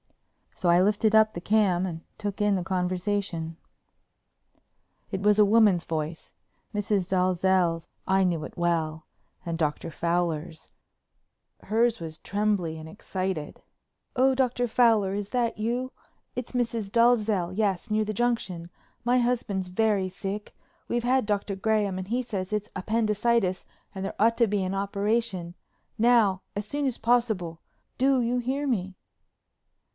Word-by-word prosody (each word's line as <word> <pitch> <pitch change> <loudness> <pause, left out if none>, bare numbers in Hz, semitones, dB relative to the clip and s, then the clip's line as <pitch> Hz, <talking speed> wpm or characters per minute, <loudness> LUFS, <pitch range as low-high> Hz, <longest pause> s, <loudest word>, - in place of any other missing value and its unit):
So 180 - -2
I 175 +1 +6
lifted 210 +2 +2
up 220 0 +5
the 170 - -6
cam 190 -3 +2
and 165 -2 -6 0.2
took 205 -1 -4
in 205 -1 +3
the 185 - -1
conversation. 180 -2 -2 1.5
It 190 - -3
was 210 +1 +4
a 210 - +8
woman's 205 -4 +4
voice—Mrs. 180 +5 -4
Dalzell's, 185 -2 +2 0.2
I 190 0 +3
knew 170 -4 0
it - - -9
well—and 165 0 -3
Dr. 155 0 -1
Fowler's. 170 -1 -2 0.9
Hers 230 +1 +2
was 160 -1 -7
trembly 200 -6 -1
and 160 0 -9
excited: 185 -4 -4 0.5
"Oh, 260 +1 +4
Dr. 250 -2 +1
Fowler, 220 -5 +3
is 205 0 -4
that 240 -2 0
you? 240 +4 -2 0.4
It's 250 -1 -5
Mrs. 230 -5 -2
Dalzell, 215 -6 +3
yes, 205 0 0
near 215 0 +2
the 215 - -3
Junction. 195 -7 -1 0.3
My 245 +1 +3
husband's 230 -6 0
very 195 0 +1
sick. 195 +3 -6 0.3
We've 240 0 -1
had 255 0 +2
Dr. 205 -1 -1
Graham 205 -1 0
and 185 0 -5
he 240 +4 0
says 195 -5 -4
it's 210 -1 -2
appendicitis 215 -1 +1 0.3
and 190 - -4
there - - -5
ought 230 +2 +4
to 235 - +4
be 205 -1 0
an 185 +1 -2
operation—now, 200 +1 0
as 205 +1 -3
soon 285 +4 -2
as 260 -4 0
possible. 220 -9 +1 0.4
Do 265 0 +4
you 240 +1 0
hear 265 +4 -1
me?" 190 -7 -1
205 Hz, 140 wpm, -27 LUFS, 180-230 Hz, 1.5 s, a